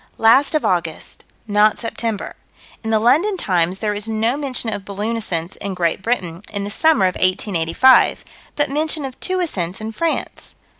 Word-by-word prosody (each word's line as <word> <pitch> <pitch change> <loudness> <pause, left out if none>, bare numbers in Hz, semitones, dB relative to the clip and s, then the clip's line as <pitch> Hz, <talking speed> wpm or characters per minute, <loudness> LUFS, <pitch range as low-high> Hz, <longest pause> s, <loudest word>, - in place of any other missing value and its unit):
Last 260 +7 +4
of 305 - +1
August: 170 -3 -2 0.2
not 210 0 +3
September. 230 -2 -4 0.5
In 220 - -3
the 220 - +3
London 325 - +3
Times 180 - 0
there 210 0 -1
is 205 +1 -5
no 225 +3 0
mention 260 -6 -2
of 205 -1 -5
balloon 205 +3 -3
ascents 175 -6 -3
in 195 -2 -5
Great 170 0 0
Britain, 185 -6 -2
in 200 -1 -4
the 205 - -4
summer 310 -3 +3
of 185 - +1
1885, 185 +5 +3 0.3
but 290 - +1
mention 305 0 0
of 260 -1 -8
two 370 0 -1
ascents 190 - -3
in 220 +1 -5
France. 330 +8 -3
215 Hz, 170 wpm, -19 LUFS, 190-260 Hz, 0.5 s, Last